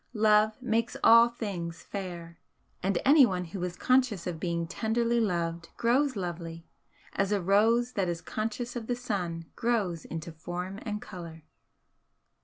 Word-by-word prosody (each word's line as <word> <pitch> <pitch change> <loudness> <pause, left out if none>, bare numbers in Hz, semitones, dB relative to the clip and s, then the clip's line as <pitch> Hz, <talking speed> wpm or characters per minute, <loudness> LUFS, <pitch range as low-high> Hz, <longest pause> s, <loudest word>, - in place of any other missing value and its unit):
Love 215 0 +4
makes 230 -1 0
all 230 +1 +8
things 180 -8 -5
fair, 175 -4 -7 0.4
and 190 0 +1
anyone 250 - +5
who 175 +2 -6
is 180 -1 -3
conscious 250 -7 +2
of 175 -3 -4
being 170 -1 -1
tenderly 230 +5 0
loved 170 -5 -1
grows 255 +3 +2
lovely, 170 -3 -5 0.5
as 195 0 0
a 205 - +2
rose 220 +6 +3
that 190 -3 0
is 170 -1 -2
conscious 225 +6 -4
of 230 -2 -5
the 245 - 0
sun 180 -9 -3
grows 205 -9 0
into 165 +1 -6
form 175 +4 -6
and 210 -2 -4
colour. 165 -4 -9
195 Hz, 145 wpm, -29 LUFS, 170-230 Hz, 0.5 s, all